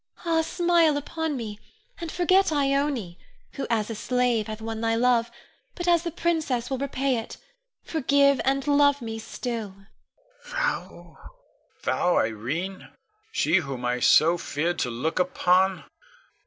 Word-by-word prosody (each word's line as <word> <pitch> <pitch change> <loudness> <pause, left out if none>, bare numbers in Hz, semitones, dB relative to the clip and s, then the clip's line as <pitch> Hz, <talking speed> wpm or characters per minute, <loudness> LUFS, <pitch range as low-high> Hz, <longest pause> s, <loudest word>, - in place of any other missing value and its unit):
Ah, 325 -1 +2
smile 335 -2 +2
upon 315 0 -3
me, 215 -3 -6 0.4
and 335 -2 -5
forget 370 +1 +3
Ione, 275 - 0 0.3
who 275 - -5
as 220 -3 +1
a - - -2
slave 245 -1 0
hath 215 0 -6
won 225 0 -5
thy 225 0 +1
love, 235 0 +2 0.5
but 350 -1 -5
as 345 -1 +4
the 340 - -3
princess 310 -8 -1
will 265 - -1
repay 275 -1 0
it, 225 - -8 0.5
forgive, 280 -2 +2
and 270 0 0
love 285 0 +4
me 225 -1 -5
still! 225 -3 -5 0.7
Con. - - -8
Thou, - - -3 0.7
thou 180 - +1
Irene, 135 - -2 0.4
she 165 - +2
whom 135 -7 -3
I 125 0 0
so 165 +7 +5
feared 170 +5 -2
to 125 - 0
look 125 +9 -2
upon? 185 +1 +2
245 Hz, 140 wpm, -25 LUFS, 190-290 Hz, 0.7 s, so